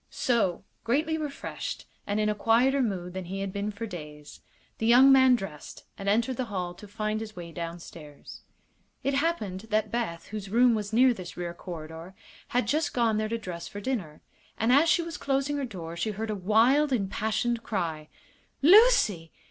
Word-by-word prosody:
So, 205 -9 0 0.2
greatly 295 +7 +1
refreshed, 300 -3 -5 0.2
and 205 +1 0
in 210 - +1
a 210 - +2
quieter 240 +6 +3
mood 185 -7 -2
than 190 -1 -5
he 195 +3 -5
had 195 -1 -4
been 200 +1 -2
for 210 +2 -5
days, 150 -7 -10 0.4
the 225 - 0
young 255 +3 +7
man 260 -1 +6
dressed 195 -10 -8
and 200 0 -3
entered 235 +4 +1
the 255 - -1
hall 185 -5 -4
to 205 +4 -13
find 215 +1 -2
his 215 -1 -8
way 170 -2 -8
downstairs. 165 -3 -9 0.6
It 275 - 0
happened 225 - -1
that 215 0 0
Beth, 230 -8 -3
whose 205 -2 -6
room 240 +3 +4
was 210 -2 -3
near 250 +3 +5
this 185 -5 -9
rear 175 -1 -4
corridor, 165 +1 -9 0.3
had 245 +1 0
just 310 +2 0
gone 230 -3 +2
there 215 0 -1
to 230 - -1
dress 180 -6 -7
for 205 - -7
dinner, 195 -10 -4 0.4
and 225 +3 +2
as 305 +5 +5
she 340 +2 +3
was 335 -1 -6
closing 275 +1 -1
her 280 - -2
door 170 -8 -7
she 170 +6 -2
heard 215 +1 -3
a - - -2
wild, 230 +10 +3
impassioned 220 +1 -1
cry: 165 -9 -3 0.6
"Lucy!" 330 - +5
215 Hz, 185 wpm, -27 LUFS, 180-250 Hz, 0.6 s, young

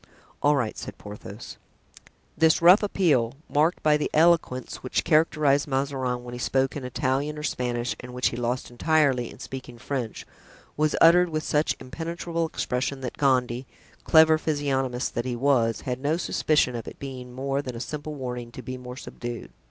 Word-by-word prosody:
"All 145 +1 +4
right," 120 -6 -1
said - - -8
Porthos.) 105 +1 -9 0.8
This 160 -1 +4
rough 180 +5 +7
appeal, 150 - +1
marked 155 +4 +1
by 150 -1 +4
the 150 - -2
eloquence 160 -6 +2
which 130 - -2
characterized 155 -2 +3
Mazarin 135 -3 -1
when 120 0 -8
he 125 - -6
spoke 135 +1 0
in 145 - -5
Italian 135 +3 -1
or 150 - -6
Spanish 125 -3 -2
and 125 - -9
which 125 0 +1
he - - -6
lost 120 +1 -2
entirely 135 -2 +2
in - - -12
speaking 130 -2 -8
French, 125 -2 -4 0.5
was 155 0 +1
uttered 175 +2 +7
with 155 -1 -2
such 150 +1 +1
impenetrable 165 +4 -3
expression 135 -2 -2
that 125 - -5
Gondy, 130 -2 +1 0.4
clever 160 0 +6
physiognomist 135 -5 -1
as 120 - 0
he 125 -1 -3
was, 120 -3 +2
had 125 -2 -3
no 145 +4 0
suspicion 150 -7 +1
of 115 - -6
its - - -8
being 130 -2 -7
more 135 +2 -2
than 125 -4 -6
a - - -5
simple 150 +4 -5
warning 125 -3 -5
to 130 - -8
be 130 +2 -5
more 125 0 -8
subdued. 120 -3 -7
135 Hz, 175 wpm, -26 LUFS, 125-150 Hz, 0.8 s, rough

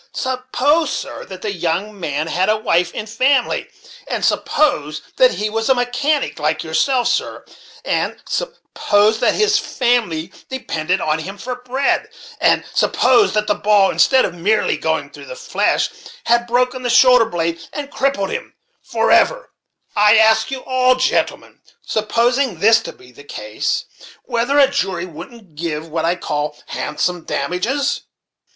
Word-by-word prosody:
Suppose, 260 +4 0
sir, - - -5
that 185 -1 -10
the 210 -2 -2
young 180 +4 -3
man 150 -3 -2
had 185 +4 0
a 215 - +3
wife 175 -5 +1
and 215 - -5
family; 255 +4 +1 0.4
and - - -2
suppose 150 - 0
that - - +4
he 210 - -1
was 225 +2 -2
a 265 - +5
mechanic 255 - -1
like 155 +1 -1
yourself, 235 +11 +1
sir; - - -2 0.4
and - - -1
suppose 220 - 0
that - - +2
his 425 0 +3
family 225 - -1 0.2
depended 180 -8 -2
on 155 0 0
him 195 +5 -7
for 250 +5 -5
bread; 250 +2 -1 0.3
and - - +3
suppose 410 - +3
that 210 0 +1
the 210 - +2
ball, 205 -2 +3
instead 265 -1 +4
of 175 - -4
merely 205 +5 +1
going - - -2
through - - -12
the - - -8
flesh, 475 - 0 0.4
had 235 0 +2
broken 250 +2 0
the 245 - -2
shoulder 250 -1 +6
blade, 170 -4 -2
and 285 -1 -6
crippled 265 -8 -1
him - - -6 0.3
forever; - - +2 0.4
I 210 +1 +5
ask 220 0 +4
you 265 -1 -5
all, 255 0 +2
gentlemen, 255 0 -1 0.2
supposing 235 0 0
this 220 +4 +5
to - - -7
be 125 - -18
the 135 +3 -15
case, 105 -6 -3 0.4
whether 240 +5 0
a 280 -2 +7
jury 190 -10 -2
wouldn't 180 +3 -12
give 155 0 -4
what 160 +1 -2
I 170 +2 +1
call 150 -3 -3
handsome 175 +3 -2
damages?" 225 - -1
220 Hz, 155 wpm, -18 LUFS, 170-255 Hz, 0.4 s, a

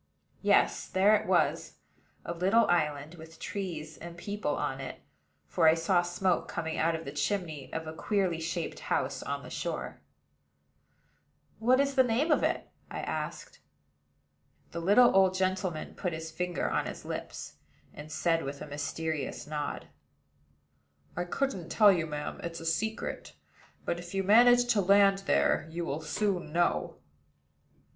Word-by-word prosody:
Yes: - - +3
there 200 +3 +4
it 210 - -1
was, - - +1 0.5
a 170 - -3
little 195 +7 +3
island, 150 -2 0
with 160 -1 -12
trees 160 -6 -5
and 170 0 -9
people 200 -5 -2
on 135 - -2
it; 135 - -7 0.5
for 75 - +2
I 160 - +7
saw 175 +2 +2
smoke 175 +1 0
coming 160 0 -3
out 165 +1 +2
of 160 0 -6
the 140 - -5
chimney 150 -1 -2
of 160 0 -4
a 155 - -6
queerly 185 -1 0
shaped 165 +1 -3
house - - -1
on - - -4
the - - -10
shore. - - -4 1.6
"What 250 +3 +4
is 280 0 +2
the 265 - +5
name 255 +6 +1
of - - +4
it?" - - 0 0.2
I - - -5
asked. - - -5 1.1
The 170 - -4
little 205 +8 +5
old 190 -1 +5
gentleman 185 -3 -1
put 180 -3 -3
his 160 0 -6
finger 180 +2 -2
on - - 0
his - - -8
lips, - - -6 0.4
and 150 +1 -10
said, 165 0 +1
with 140 +1 -5
a - - -6
mysterious 150 0 -3
nod: 150 -1 -4 1.3
"I 175 - -2
couldn't 190 -3 -2
tell 210 -2 +6
you, 170 -4 0
ma'am. 150 -1 -5
It's 170 0 -5
a 165 - -9
secret; 220 +7 -2 0.5
but, 170 - -1
if 175 +2 -8
you 195 - +1
manage 245 +4 +6
to 205 - +2
land 195 +1 +5
there, - - +2
you 170 +1 -4
will 150 0 -3
soon 180 0 -1
know." 175 +2 +1
175 Hz, 155 wpm, -30 LUFS, 160-200 Hz, 1.6 s, I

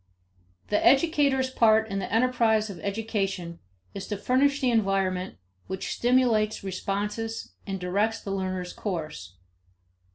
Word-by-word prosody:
The 210 - +1
educator's 275 -1 +3
part 220 -3 +4
in 195 -2 -3
the 185 - -5
enterprise 225 -2 +2
of 180 - -10
education 195 -4 -3 0.3
is 195 - -6
to 205 - -3
furnish 275 +7 +2
the 255 -3 +2
environment 195 - 0 0.3
which 190 0 -4
stimulates 235 -4 +2
responses 205 +4 -3
and 195 -1 -3
directs 205 +5 0
the 200 - -6
learner's 185 -2 -3
course. 155 - -5
210 Hz, 125 wpm, -27 LUFS, 190-235 Hz, 0.3 s, part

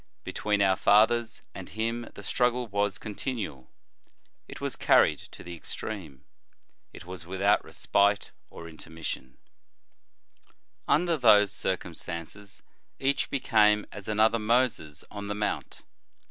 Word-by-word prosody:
Between 105 -1 0
our 95 -1 +4
fathers 115 +3 +3
and - - -8
him 115 +3 -3
the 100 - -10
struggle 125 +4 +1
was 100 -2 -1
con 105 +2 -7
tinual; 100 - -4 0.8
it - - -9
was - - -3
carried - - +4
to - - -12
the 85 0 -7
extreme; 80 -5 -7 0.7
it - - -12
was 90 -2 -9
without 95 +2 +2
respite 100 0 +1 0.2
or 85 - -10
intermission, 80 -5 -7 1.5
Under 170 +1 +3
those 105 -6 +6
circumstances 90 +2 -5 0.3
each 135 +1 0
became 105 -6 +3
as 100 -2 -9
another 110 +2 +3
Moses 110 - 0
on 100 -1 -6
the 105 - -3
Mount. 105 0 -3
105 Hz, 120 wpm, -28 LUFS, 95-115 Hz, 1.5 s, those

